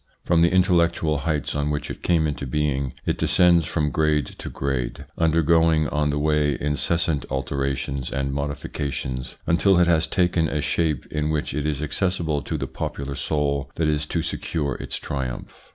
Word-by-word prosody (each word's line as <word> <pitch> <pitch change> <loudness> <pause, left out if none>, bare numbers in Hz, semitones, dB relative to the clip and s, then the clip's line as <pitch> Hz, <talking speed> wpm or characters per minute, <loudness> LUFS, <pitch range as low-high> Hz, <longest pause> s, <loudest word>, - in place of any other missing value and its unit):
From 85 -1 +3
the 85 - +5
intellectual 85 -4 +3
heights 75 -4 -1
on 75 0 -1
which 75 -1 -2
it - - -8
came 85 -3 +2
into 70 -2 -3
being, 70 -1 -1
it - - -1
descends 85 -2 +4
from 75 -3 0
grade 75 -2 +2
to - - -5
grade, 65 -3 -3
undergoing 80 -1 +3
on 75 0 0
the 75 - 0
way 75 -1 +2
incessant 75 +1 0
alterations 70 0 -2
and 70 0 -2
modifications 70 -2 -4
until 90 +3 +4
it 90 - +5
has 85 -2 +3
taken 85 -2 +2
a 75 - -1
shape 75 -2 0
in 75 0 -1
which 75 -4 -1
it 75 +1 -1
is 75 -1 -1
accessible 80 -2 -1
to 80 - -3
the 70 - -2
popular 70 +1 -4
soul 70 -1 -1
that 80 - +1
is 75 0 0
to 80 0 -1
secure 75 -5 -2
its - - -5
triumph. 65 -3 -5
75 Hz, 170 wpm, -24 LUFS, 70-80 Hz, -, the